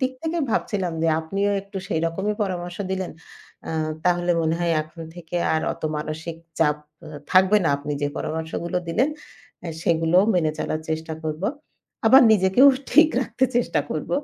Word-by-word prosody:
দিক 260 0 0
থেকে 330 +1 -1
ভাবছিলাম 190 -5 -1
যে 165 - +3
আপনিও 195 +5 -1
একটু 200 -1 -7
সেই 160 -6 0
রকমই 190 +6 -2
পরামর্শ 175 -3 -4
দিলেন। 190 -1 -2 0.6
আ - - -2 0.3
তাহলে 175 0 +2
মনে 160 0 +1
হয় 170 -1 +1
এখন 155 +2 -11
থেকে 175 0 -6 0.2
আর 160 - +1
অত - - -14
মানসিক 160 +2 -5 0.2
চাপ 150 -2 +3 0.3
অ - - -10 0.3
থাকবে 190 +2 +6
না। - - +3
আপনি 145 +1 -5
যে - - +2
পরামর্শগুলো 160 +3 -3
দিলেন 240 - +2 0.6
এ - - -4
সেগুলো 165 +1 +3 0.2
মেনে 160 -4 +2
চলার 155 - -2
চেষ্টা 160 0 -3
করব। 155 +2 -4 0.6
আবার 260 +4 +8
নিজেকেও 190 +6 +5 0.3
ঠিক 310 0 +7
রাখতে 260 0 0
চেষ্টা 230 -10 +1
করব। 155 - -4
175 Hz, 165 wpm, -23 LUFS, 160-195 Hz, 0.6 s, আবার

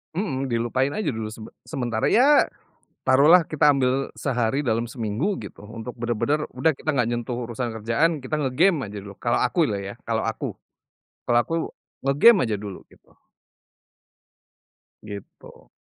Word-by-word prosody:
Mhm, 135 -8 -2
dilupain 120 +3 0
aja 210 +9 -2
dulu 110 -1 -4
sebe 110 0 -10
sementara. 120 -6 -2
Ya, 280 +5 +5 0.6
taruh 135 +4 +5
lah 175 -2 +7
kita 150 -2 +4
ambil 135 -1 +1
sehari 135 +1 0
dalam 115 0 0
seminggu 125 - -2
gitu, 100 -1 -10
untuk 115 +3 -8
benar-benar, 120 +6 -1
udah 140 +5 +1
kita 155 - -2
nggak 130 -6 +1
nyentuh 120 +1 -3
urusan 120 +1 -3
kerjaan 140 +10 +1
kita 135 +3 -4
nge-game 155 +7 +3
aja 105 - -7
dulu. 100 0 -9
Kalau 120 0 +2
aku 125 +8 0
loh 100 - -1
ya, 100 +1 -6
kalau - - -1
aku. - - -3 0.8
Kalau 120 - +4
aku 165 - -4 0.5
nge-game 170 +12 +6
aja 105 - 0
dulu 100 -2 -7
gitu. - - -24 1.9
Gitu. 100 -2 -11
125 Hz, 150 wpm, -24 LUFS, 115-150 Hz, 1.9 s, lah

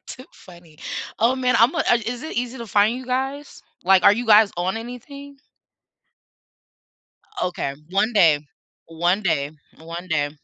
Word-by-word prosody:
Too 255 - -10
funny. 170 -4 -17 0.4
Oh 240 +4 +2
man. 250 -1 +1
I'm 235 +7 +4
a - - -2
uh, 240 - +3
is 245 +1 -4
it 315 - -7
easy 245 +2 -3
to 235 - -7
find 210 +3 +2
you 255 0 -9
guys? 270 +3 -4 0.2
Like, 190 0 +5
are - - +7
you 235 +3 -3
guys 215 -1 +6
on 180 +4 -1
anything? 275 +4 -9 2.0
Okay, 175 -6 -3 0.2
one 205 +5 +1
day, 165 -8 +4 0.5
one 175 +5 0
day, 145 -7 0 0.3
one 170 +3 -8
day. 145 -3 0
215 Hz, 155 wpm, -22 LUFS, 175-250 Hz, 2.0 s, are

